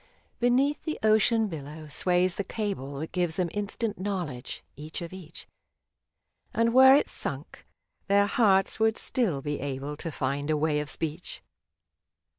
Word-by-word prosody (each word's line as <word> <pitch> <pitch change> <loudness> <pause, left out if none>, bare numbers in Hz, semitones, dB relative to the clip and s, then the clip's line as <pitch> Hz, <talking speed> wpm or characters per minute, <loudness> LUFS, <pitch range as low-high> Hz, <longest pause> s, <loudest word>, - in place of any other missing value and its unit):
Beneath 260 +5 +2
the 310 - -3
ocean 220 +1 +4
billow 155 -2 -7
sways 180 +4 +1
the 200 - -3
cable 195 - -4
That 155 +3 -5
gives 175 -3 -1
them 180 -1 0
instant 205 +1 -2
knowledge, 180 -11 -4
each 150 +3 -6
of 170 - -8
each, 175 -3 -11 1.1
And 230 0 +2
were 265 +1 +9
it 290 - +3
sunk, - - -5 0.4
their 200 0 +4
hearts 200 -3 +2
would 220 0 +2
still 180 - 0
be 145 -1 -2
able 140 +1 -4
To 165 +1 -5
find 140 +2 -2
a 155 - +2
way 150 0 +1
of 150 0 -4
speech. 160 +4 -5
180 Hz, 150 wpm, -27 LUFS, 150-215 Hz, 1.1 s, were